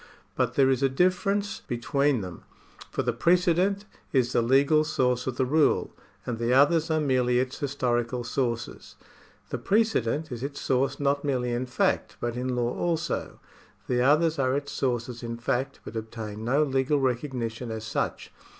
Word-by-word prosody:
But - - 0
there 135 -1 +4
is 130 0 0
a 135 - +3
difference 195 +7 +1
between 135 +2 0
them, 90 -3 -8 0.5
for - - -2
the 120 - 0
precedent 180 - +2 0.3
is 125 -2 +2
the - - +3
legal 140 +6 +4
source 125 -5 0
of 130 - -2
the 130 - +2
rule, 150 +4 +2 0.3
and 120 -2 -3
the 120 +1 +1
others 150 +5 +4
are 160 0 +2
merely 130 -4 +2
its 130 +1 -1
historical 125 -3 -1
sources. 120 -1 -3 0.6
The - - -2
precedent 160 - +1
is 120 -1 -5
its 140 +1 -5
source 135 +1 0
not 140 0 +1
merely 125 -4 0
in 120 +2 -2
fact, 125 - 0
but 120 -1 -2
in 125 +1 -2
law 120 0 -1
also; 170 -1 -2 0.5
the 125 -1 +1
others 155 +4 +3
are 130 0 +2
its 140 0 -5
sources 120 -2 -2
in 115 -1 -5
fact, 125 +3 -2
but 115 - -8
obtain 110 -1 -6
no 135 +6 +2
legal 135 +1 +1
recognition 125 -3 -2
as 110 -1 -5
such. 110 - -3
130 Hz, 170 wpm, -27 LUFS, 120-145 Hz, 0.6 s, there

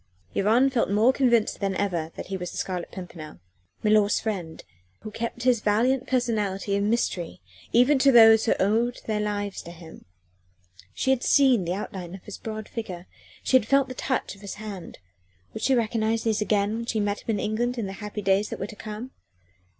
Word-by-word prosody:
Yvonne 225 +7 +3
felt 245 -3 +1
more 215 +6 +4
convinced 240 -5 +2
than 195 -1 -1
ever 175 -5 -2
that - - -6
he 195 - -5
was 180 -1 -4
the - - -9
Scarlet 180 -2 -3
Pimpernel 165 - -9 0.4
milor's 210 -1 +3
friend 185 -7 -4 0.4
who 215 - -8
kept 235 +2 -4
his 245 -3 +3
valiant 240 +5 +1
personality 210 -6 0
a 200 - 0
mystery, 200 - -1 0.3
even 250 +4 +4
to 275 +1 +5
those 225 -2 +7
who 225 - +3
owed 225 +5 +1
their 215 -1 -1
lives 205 -1 -3
to - - -11
him. 165 -1 -13 0.9
She 265 - +1
had 265 -2 +1
seen 260 -9 +4
the 175 +2 -1
outline 190 -3 -6
of 190 - -12
his 210 - -9
broad 215 -1 -6
figure, 185 -6 -6 0.4
she - - +2
had 250 -4 +4
felt 275 +1 +3
the - - -5
touch 260 +1 -2
of 200 - -16
his 200 - -7
hand. 205 -5 -8 0.6
Would - - -6
she 265 - +3
recognise 225 -1 0
these 220 -2 0
again 210 0 +1
when 230 - -4
she 220 - -1
met 205 0 -1
him 225 - -2
in - - -3
England 240 +4 -1
in 230 - -2
the 195 - -5
happy 210 0 -5
days 195 +2 +2
that - - -5
were - - -2
to 210 - -10
come? 215 +5 -7
215 Hz, 200 wpm, -25 LUFS, 195-235 Hz, 0.9 s, those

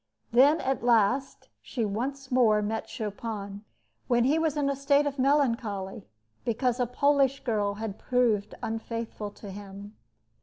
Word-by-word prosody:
Then 280 +6 +5
at 265 -1 -1
last 240 +3 +2
she 235 -5 -3
once 260 +6 -4
more 220 -4 +4
met 220 +2 -3
Chopin, 205 -2 -5 0.4
when 240 -1 +3
he 290 +6 +3
was 315 -2 0
in 285 -1 +1
a 280 - 0
state 280 +1 +3
of 280 -1 -3
melancholy, 230 -8 0 0.4
because 245 +2 0
a 245 - +1
Polish 275 +1 +2
girl 210 -4 0
had 215 -1 -5
proved 230 -5 +1
unfaithful 225 -1 -4
to 205 0 -10
him. 200 +1 -10
235 Hz, 145 wpm, -28 LUFS, 210-270 Hz, 0.4 s, Then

